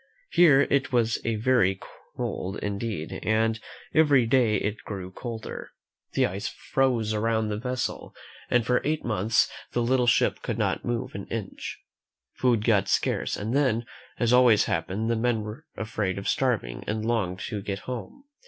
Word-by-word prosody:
Here 150 -6 +6
it 140 -1 +2
was 115 -2 +2
very 110 -4 +2 0.4
cold 95 +2 -3
indeed, 100 -5 -4
and 110 +1 +1 0.3
every 145 -6 +5
day 115 -2 +3
it 105 +1 -2
grew 95 -3 -6
colder. 115 +2 -6 0.4
The - - +3
ice 95 +4 -3
froze 120 -5 0
around 110 0 0
the 105 - -2
vessel, 125 +1 -3 0.3
and 120 -2 +3
for 125 +2 +2
eight 155 +1 -1
months 110 -1 +2 0.3
the 120 - +1
little 125 0 +2
ship 115 - +3
could - - -3
not - - 0
move 120 -1 -2
an 100 - -6
inch. 110 -4 -6 0.5
Food 120 -4 +1
got 100 -4 +3
scarce, - - 0
and 110 +5 -2
then, 125 -5 +2 0.3
as 120 0 +2
always 120 -4 +6
happens, 95 +6 -1
the 115 - +2
men 115 -1 0
were 110 +9 -8
afraid 110 -4 -2
of 100 - -5
starving 110 - 0
and 110 +1 -2
longed 105 -6 0
to 105 -3 -3
get 100 -1 -4
home. 125 - -6
115 Hz, 160 wpm, -26 LUFS, 105-125 Hz, 0.5 s, Here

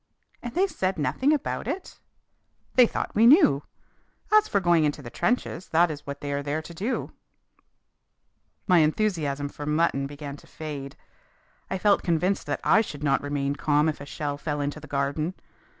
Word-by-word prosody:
"And 240 +3 -7
they 370 +3 +4
said 190 - -2
nothing 260 - +1
about 300 - -1
it!" 380 - -5 0.7
"They 250 -2 +6
thought - - -4
we 225 +2 +5
knew. 265 - +6 0.7
As 430 0 +6
for 200 - +1
going 175 -3 +3
into 145 -1 -1
the 120 - -8
trenches, 205 - -1
that 165 +1 +3
is 145 -1 -9
what 140 0 -6
they 145 -1 -3
are 140 - -1
there 145 +2 -2
to 170 - -10
do." 205 +10 -3 1.5
My 180 -3 +5
enthusiasm 155 -4 0
for 145 +1 -8
mutton 150 -3 +1
began 145 0 -8
to - - -18
fade. 145 -3 -7 0.7
I 190 - -1
felt 205 +2 +3
convinced 180 +3 0
that - - -2
I 220 - +5
should 150 -9 -7
not 140 -2 +2
remain 145 -1 -2
calm 150 +1 +2
if 155 - -2
a 140 - -8
shell 145 0 -4
fell 150 -1 -3
into 145 +1 -3
the 155 - -12
garden. 145 +5 -1
155 Hz, 180 wpm, -26 LUFS, 145-190 Hz, 1.5 s, They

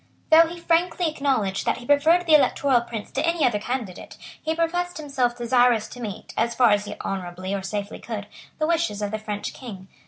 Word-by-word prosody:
Though 325 +1 +8
he 340 +1 -8
frankly 340 +1 +1
acknowledged 265 -11 0
that - - +1
he 240 - -10
preferred 315 +6 +4
the 320 - +3
Electoral 280 -3 +4
Prince 235 -3 -7
to - - -1
any 335 -1 +2
other 215 -4 +1
candidate, 230 -4 -5 0.2
he 320 0 -1
professed. 350 +2 -1
himself 265 -5 -1
desirous 240 -2 +3
to 245 - -10
meet, 210 -4 -7
as 235 +1 0
far 245 -3 +5
as 205 0 +2
he 210 0 -6
honourably 185 0 -4
or 200 - -2
safely 200 +1 -5
could, 215 -3 -6 0.3
the 310 - 0
wishes 325 -11 0
of 205 - -2
the 215 - -3
French 210 -1 -5
King. 195 -7 -10
245 Hz, 200 wpm, -24 LUFS, 210-315 Hz, 0.3 s, Though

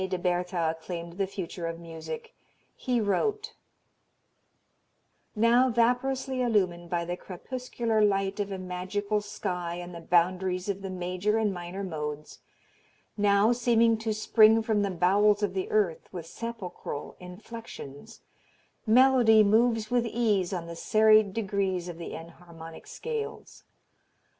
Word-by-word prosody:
de 185 - -1
Bertha 175 -2 -1
claimed 170 +1 -7
the 195 - +1
future 180 -3 -5
of 165 0 -5
music. 160 -1 -8 0.4
He 250 -2 -1
wrote: 420 - -1 1.8
"Now 235 +4 +4
vaporously 255 +3 +1
illumined 185 -8 0
by 170 0 -1
the 175 +1 -3
crepuscular 225 +3 -2
light 195 0 +1
of 200 -1 -2
a 195 - -3
magical 185 +3 -2
sky 180 -4 -4
on 175 0 -7
the 170 - -8
boundaries 180 +2 +1
of 200 -1 -2
the 195 - -5
major 185 +3 -1
and 215 -3 +1
minor 180 +2 -6
modes, 150 -4 -5 0.8
now 205 +1 +4
seeming 235 -1 +3
to 225 0 -2
spring 215 +1 +5
from 220 -2 +1
the 200 - 0
bowels 200 +4 +3
of 200 -3 0
the 190 -1 -3
earth 200 -7 0
with 175 -4 -7
sepulchral 210 -7 -6
inflexions, 185 -2 -10 0.7
melody 240 -2 +6
moves 225 +1 +2
with 240 -1 +2
ease 215 -6 +1
on 175 -3 -3
the 170 0 -8
serried 215 +2 +4
degrees 195 -4 -1
of 170 -1 -7
the 170 - -6
enharmonic 165 0 -11
scales. 455 -2 -6
200 Hz, 135 wpm, -28 LUFS, 175-225 Hz, 1.8 s, melody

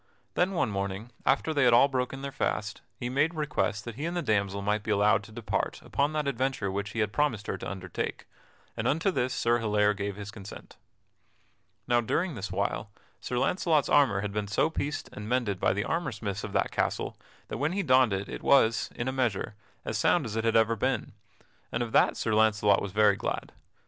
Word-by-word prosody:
Then 185 +2 +1
one 170 - 0
morning, 100 +3 -3 0.2
after 140 +4 +2
they 140 -2 +2
had 120 -1 +5
all 120 +4 +7
broken 135 0 -2
their 140 - -4
fast, 110 -6 -2 0.2
he 120 - -4
made 145 +7 +1
request 130 -8 -1
that 120 - -5
he 145 +8 -5
and 170 +1 -2
the 175 - -1
damsel 100 -2 0
might 105 +1 +1
be 110 - -8
allowed 105 -1 +4
to 110 - -14
depart 110 -1 -2
upon 140 +2 0
that 150 -2 -1
adventure 130 -6 -1
which 100 +1 -3
he 115 - 0
had 105 -1 -1
promised 120 -8 0
her - - -2
to - - -5
undertake, 90 -2 -5 0.5
and - - -1
unto 165 +7 +2
this 130 -6 0
Sir 120 -1 +1
Hilaire 105 -2 +2
gave 100 -1 -4
his 105 +1 -7
consent. 105 -3 -11 1.1
Now, 120 -1 +3
during 165 +9 0
this 100 -5 -5
while, 100 +2 -2 0.3
Sir 125 - -3
Launcelot's 160 +1 +2
armor 130 -10 +4
had 105 0 -3
been 105 0 -2
so 105 +10 +1
pieced 145 -2 -3
and 105 +1 -7
mended 120 -7 0
by - - +3
the 100 +2 -1
armor 165 -4 -1
smiths 100 -3 -4
of 105 - -5
that - - +1
castle - - -1 0.3
that - - -4
when 150 +5 0
he 200 +1 0
donned 130 - +4
it 100 +1 -2
it - - -6
was, 115 -5 +4
in 120 - -3
a - - +1
measure, 120 -5 -1 0.3
as - - -2
sound - - +3
as 110 - -5
it 115 - 0
had 115 - +2
ever 115 0 +4
been, 105 - -1 0.6
and 120 - 0
of 115 - -6
that - - +4
Sir 110 - -1
Launcelot 105 -2 +4
was 100 - -4
very 105 0 +4
glad. - - -3
115 Hz, 215 wpm, -28 LUFS, 105-135 Hz, 1.1 s, all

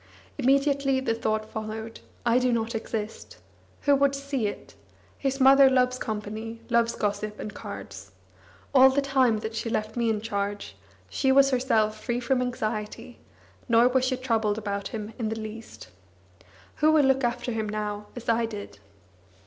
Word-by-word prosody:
Immediately 275 0 +2
the 230 -3 0
thought 215 -1 -1
followed: 220 +1 -6 0.3
"I 240 +1 +4
do 250 0 +1
not 230 0 -1
exist. 220 -1 -5 0.4
Who 285 -1 +4
would 280 0 +2
see 275 -5 -2
it? 205 - -8 0.5
His 270 0 -1
mother 270 +1 +7
loves 255 -1 +2
company, 220 +1 -5
loves 235 0 +2
gossip 210 0 -2
and 210 - -6
cards. 100 - -8 0.6
All 265 0 +8
the 280 +1 +1
time 260 -6 +2
that 220 +1 -5
she 225 +1 -3
left 215 0 -2
me 235 -1 +1
in 220 -1 0
charge, 200 - -4 0.3
she 265 - +1
was 275 +1 +5
herself 220 -4 +1
free 240 -1 -1
from 250 +1 0
anxiety, 225 -1 -4 0.5
nor 235 +1 +6
was 255 0 +2
she 255 0 0
troubled 225 -5 0
about 200 -2 -3
him 215 0 -6
in 220 -2 -1
the 220 0 -4
least. 220 +1 -9 0.9
Who 310 +1 +4
will 310 -2 +5
look 265 0 +2
after 245 +1 -1
him 220 -2 -2
now 210 0 -4
as 245 - -9
I 230 0 +2
did?" 210 -2 -8
230 Hz, 165 wpm, -26 LUFS, 215-260 Hz, 0.9 s, All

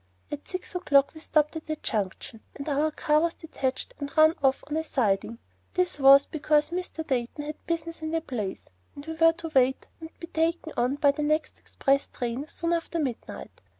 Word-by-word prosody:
At 295 0 -6
six 365 -1 -5
o'clock 285 -6 +3
we 315 - -11
stopped 305 0 +1
at 315 - -10
a 310 - 0
junction, 215 -2 -4
and 280 - -7
our 295 +1 +2
car 300 0 +2
was 335 +1 0
detached 270 -5 -3
and 285 0 -5
run 315 +1 +7
off 270 -1 +2
on 295 - -3
a 320 - 0
siding. 230 -6 0 0.4
This 365 -3 +1
was 275 +1 +8
because 300 0 +1
Mr. 350 -2 -4
Dayton 260 +2 -2
had 300 +1 -8
business 330 0 -3
in 315 - -3
the 325 0 0
place, 215 -10 -4 0.3
and 285 0 -9
we 320 - -4
were 330 0 +5
to 330 -1 -7
wait 260 0 +3
and 320 -1 -8
be - - -6
taken 330 0 -1
on 250 +3 +1
by 285 -1 +4
the 290 - -5
next 305 +1 0
express 275 0 0
train 245 +4 -4
soon 335 +1 -2
after 335 0 -2
midnight. 270 -7 -5
300 Hz, 200 wpm, -27 LUFS, 270-325 Hz, 0.4 s, was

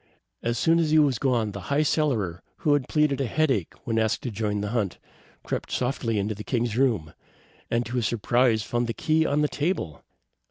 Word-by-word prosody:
As 115 0 -1
soon 165 +8 +3
as 160 -2 +1
he 155 - +4
was 140 -6 +3
gone, 120 -5 +1
the 100 -1 -8
High 145 +2 +3
Cellarer, 115 - 0 0.2
who 150 - +5
had 145 -3 0
pleaded 150 -3 +2
a 135 - 0
headache 130 - 0
when 115 -1 0
asked 110 -1 0
to 125 - -3
join 105 -1 -2
the 105 - -2
hunt, 105 -7 -1 0.5
crept - - -4
softly 125 -2 -1
to 110 - -1
the 105 +1 -8
king's 120 -3 -1
room, 115 -12 +1 0.6
and 120 +1 0
to 125 +2 -3
his 115 -3 +1
surprise 120 0 +2
found 120 +3 -1
the 115 - -3
key 160 +7 +2
on 145 +1 +1
the - - +3
table. 145 - -2
120 Hz, 205 wpm, -26 LUFS, 110-145 Hz, 0.6 s, who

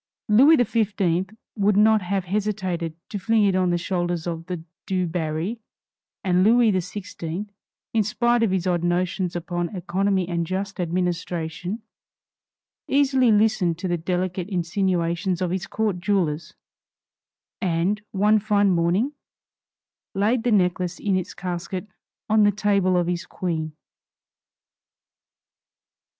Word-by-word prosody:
Louis 260 +9 +7
XV 205 -6 +1 0.3
would 205 -1 +2
not 215 0 +5
have 190 0 -2
hesitated 185 -4 -2
to 205 - -4
fling 215 +2 +3
it 195 -2 +2
on 185 -1 +2
the 175 - +2
shoulders 175 -1 -2
of 165 -1 -4
the 180 -3 -5 0.2
Du 185 -1 0
Barry, 165 +5 -2 0.6
and 185 -2 +3
Louis 230 +1 +5
XVI, 185 0 -4 0.5
in 225 - +3
spite 240 +3 +1
of 225 - +3
his 185 -1 0
odd 175 -2 0
notions 180 +1 0
upon 175 +2 -3
economy 190 +1 0
and 170 -2 -2
just 195 +2 -3
administration, 175 +2 -2 1.0
easily 265 -3 +3
listened 210 -5 +2
to 185 +2 -3
the 175 - +1
delicate 180 +2 -2
insinuations 175 -1 0
of 180 -2 -1
his 185 0 -2
court 210 -5 -1
jewelers; 175 -5 -1 1.1
and, 185 +3 0
one 210 +1 +3
fine 205 -1 +2
morning, 180 +10 +1 1.0
laid 215 +5 +2
the 245 - 0
necklace 180 -3 +1
in 200 -2 0
its 185 -2 -3
casket 180 +1 -4 0.4
on 220 0 +4
the 205 0 +5
table 200 -3 +2
of 175 - +2
his 175 0 -3
Queen. 160 -4 -3
185 Hz, 130 wpm, -24 LUFS, 175-210 Hz, 1.1 s, Louis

